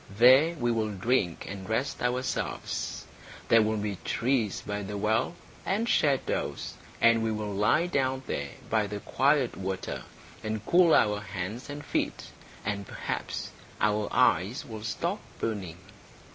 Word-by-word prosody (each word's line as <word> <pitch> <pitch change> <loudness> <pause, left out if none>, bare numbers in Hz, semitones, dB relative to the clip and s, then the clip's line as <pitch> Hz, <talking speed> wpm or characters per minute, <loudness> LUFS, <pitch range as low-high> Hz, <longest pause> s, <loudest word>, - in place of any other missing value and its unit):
There 130 - +6
we 120 -5 0
will 110 -2 0
drink 95 -4 0
and 95 0 -7
rest 125 +5 -1
ourselves. 125 +1 -2 0.4
There 115 -1 +7
will 110 0 +1
be 105 -2 -3
trees 115 -4 0
by 105 0 -3
the 100 +1 -5
well, 110 +10 +1 0.3
and 215 +4 0
shadows, 140 - +1 0.3
and 115 0 +5
we 110 0 0
will 105 -1 -3
lie 105 - +3
down 130 -5 0
there 70 0 -3 0.2
by 110 -2 +1
the 100 0 -5
quiet 140 -2 +2
water 95 0 -4 0.4
and 110 -1 -3
cool 175 -2 +6
our 105 -1 +3
hands 105 +6 -5
and 145 +1 -6
feet, - - -2 0.3
and 100 -1 -2
perhaps - - -4 0.3
our 105 -1 +2
eyes 95 +8 +3
will 110 -2 -7
stop 105 0 -2 0.2
burning." 95 -7 -3
110 Hz, 145 wpm, -29 LUFS, 105-130 Hz, 0.4 s, There